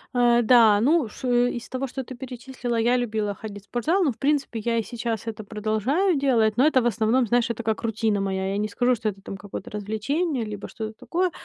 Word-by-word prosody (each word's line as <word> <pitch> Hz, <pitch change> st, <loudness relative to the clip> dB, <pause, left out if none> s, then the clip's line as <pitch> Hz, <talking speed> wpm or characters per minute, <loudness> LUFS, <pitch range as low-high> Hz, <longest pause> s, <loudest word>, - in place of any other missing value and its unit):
Э, 240 Hz, -1 st, +4 dB
да, 220 Hz, -3 st, +6 dB
ну 285 Hz, +2 st, +3 dB
ш 255 Hz, -, -6 dB, 0.2 s
из 235 Hz, -2 st, -5 dB
того, 260 Hz, +1 st, -3 dB
что 265 Hz, +1 st, -5 dB
ты 255 Hz, +1 st, -9 dB
перечислила, 250 Hz, -1 st, -5 dB
я 240 Hz, +2 st, +3 dB
любила 215 Hz, -4 st, -1 dB
ходить 205 Hz, -1 st, -9 dB
в -, -, -25 dB
спортзал, 315 Hz, -, +1 dB
но 285 Hz, -, +2 dB
в -, -, -11 dB
принципе 280 Hz, -5 st, 0 dB
я 230 Hz, +1 st, 0 dB
и 225 Hz, -, +1 dB
сейчас 230 Hz, -2 st, -4 dB
это 215 Hz, -1 st, -5 dB
продолжаю 220 Hz, -, 0 dB
делать, 230 Hz, -6 st, +2 dB
но 275 Hz, +4 st, +5 dB
это 260 Hz, -5 st, +4 dB
в -, -, -2 dB
основном, 230 Hz, +3 st, +2 dB
знаешь, 240 Hz, +1 st, +1 dB
это 235 Hz, 0 st, -3 dB
как 220 Hz, -1 st, -1 dB
рутина 220 Hz, -2 st, 0 dB
моя. 190 Hz, 0 st, -1 dB
Я 200 Hz, -, -1 dB
не 210 Hz, +1 st, 0 dB
скажу, 245 Hz, +4 st, +1 dB
что 220 Hz, -1 st, -1 dB
это 195 Hz, -1 st, -9 dB
там 195 Hz, -, -7 dB
какое-то 200 Hz, -1 st, -8 dB
развлечение, 230 Hz, -, -2 dB
либо 210 Hz, -2 st, -6 dB
что-то 220 Hz, -1 st, -6 dB
такое. 360 Hz, +1 st, 0 dB
230 Hz, 225 wpm, -24 LUFS, 215-255 Hz, 0.2 s, да